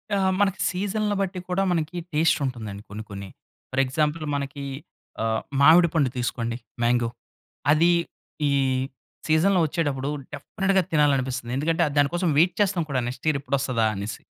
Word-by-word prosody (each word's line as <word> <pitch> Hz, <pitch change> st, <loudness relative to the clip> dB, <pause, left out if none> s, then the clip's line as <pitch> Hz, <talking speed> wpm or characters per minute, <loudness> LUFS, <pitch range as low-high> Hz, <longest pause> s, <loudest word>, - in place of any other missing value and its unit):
ఆ! -, -, +2 dB, 0.2 s
మనకి 195 Hz, -2 st, +1 dB
సీజన్‌‌ల 205 Hz, +3 st, -1 dB
బట్టి 190 Hz, -1 st, -2 dB
కూడా 185 Hz, +2 st, +1 dB
మనకి 165 Hz, 0 st, -1 dB, 0.2 s
టేస్టుంటుందండి. 130 Hz, -10 st, 0 dB
కొన్ని, 105 Hz, +2 st, -6 dB
కొన్ని. 100 Hz, -1 st, -7 dB, 0.4 s
ఫర్ 130 Hz, +1 st, +2 dB
ఎగ్జాంపుల్ 150 Hz, +4 st, -1 dB
మనకి 140 Hz, 0 st, -4 dB, 0.6 s
ఆహ్, 110 Hz, 0 st, 0 dB, 0.2 s
మావిడిపండు 160 Hz, -1 st, +5 dB
తీసుకోండి. 120 Hz, -1 st, -2 dB, 0.2 s
మ్యాంగో. 120 Hz, 0 st, +2 dB, 0.7 s
అదీ, 160 Hz, +3 st, +4 dB, 0.6 s
ఈ -, -, +2 dB, 0.8 s
సీజన్‌లో 175 Hz, +4 st, +3 dB
వచ్చేటప్పుడు 145 Hz, -4 st, -1 dB, 0.3 s
డెఫినెట్‌గా 190 Hz, +6 st, 0 dB
తినాలనిపిస్తాది. 130 Hz, -5 st, +1 dB
ఎందుకంటే, 160 Hz, +4 st, +1 dB
ఆహ్, 145 Hz, -, -3 dB
దాని 145 Hz, -1 st, +4 dB
కోసం 175 Hz, -1 st, +1 dB
వెయిట్ 175 Hz, +3 st, +4 dB
చేస్తాం 190 Hz, -4 st, +2 dB
కూడా 130 Hz, -2 st, +1 dB
నెక్స్ట్ 125 Hz, +4 st, -7 dB
ఇయర్ 150 Hz, -3 st, +2 dB
ఎప్పుడొస్తదా 130 Hz, -5 st, 0 dB
అనేసి. 100 Hz, +1 st, -5 dB
145 Hz, 140 wpm, -25 LUFS, 125-170 Hz, 0.8 s, మావిడిపండు